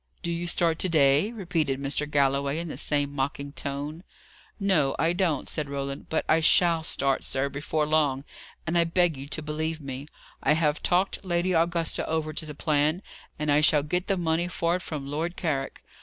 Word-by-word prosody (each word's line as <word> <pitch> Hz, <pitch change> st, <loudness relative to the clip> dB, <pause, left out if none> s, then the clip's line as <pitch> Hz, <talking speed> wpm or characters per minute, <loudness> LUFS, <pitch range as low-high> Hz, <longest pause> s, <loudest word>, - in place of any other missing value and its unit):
"Do 170 Hz, -, -2 dB
you 170 Hz, +1 st, -3 dB
start 170 Hz, -2 st, +1 dB
to 185 Hz, -, +1 dB
day?" 150 Hz, +5 st, +4 dB
repeated 170 Hz, -, -1 dB
Mr. 140 Hz, +2 st, -2 dB
Galloway, 140 Hz, 0 st, +1 dB
in 170 Hz, 0 st, -4 dB
the -, -, -5 dB
same 145 Hz, -1 st, 0 dB
mocking 140 Hz, +1 st, -3 dB
tone. 145 Hz, +4 st, -4 dB, 0.6 s
"No, 180 Hz, -9 st, +2 dB
I 165 Hz, +3 st, +2 dB
don't," 175 Hz, -6 st, 0 dB
said 150 Hz, -3 st, -2 dB
Roland. 140 Hz, 0 st, -4 dB
"But 160 Hz, -, 0 dB
I 160 Hz, -, +4 dB
shall 165 Hz, +1 st, +4 dB
start, 140 Hz, -3 st, +1 dB
sir, 135 Hz, +1 st, -1 dB
before 150 Hz, +2 st, -1 dB
long, 150 Hz, -3 st, +1 dB, 0.4 s
and 170 Hz, +2 st, +1 dB
I -, -, +5 dB
beg 170 Hz, -1 st, +2 dB
you 135 Hz, +1 st, -8 dB
to 155 Hz, +2 st, -3 dB
believe 155 Hz, +1 st, -3 dB
me. 140 Hz, -1 st, -7 dB, 0.3 s
I -, -, +3 dB
have 155 Hz, 0 st, +1 dB
talked 185 Hz, +3 st, +1 dB
Lady 180 Hz, 0 st, 0 dB
Augusta 165 Hz, -1 st, +1 dB
over 155 Hz, -1 st, -1 dB
to 155 Hz, +1 st, -3 dB
the 150 Hz, -, -7 dB
plan, 155 Hz, +4 st, +1 dB, 0.3 s
and 150 Hz, -1 st, 0 dB
I 145 Hz, +1 st, +4 dB
shall 150 Hz, -1 st, +4 dB
get 180 Hz, +5 st, -2 dB
the 195 Hz, -, +1 dB
money 170 Hz, 0 st, 0 dB
for 175 Hz, -1 st, 0 dB
it -, -, -10 dB
from 150 Hz, -5 st, -5 dB
Lord 160 Hz, +5 st, -3 dB
Carrick. 140 Hz, -6 st, -2 dB
155 Hz, 195 wpm, -26 LUFS, 140-170 Hz, 0.6 s, I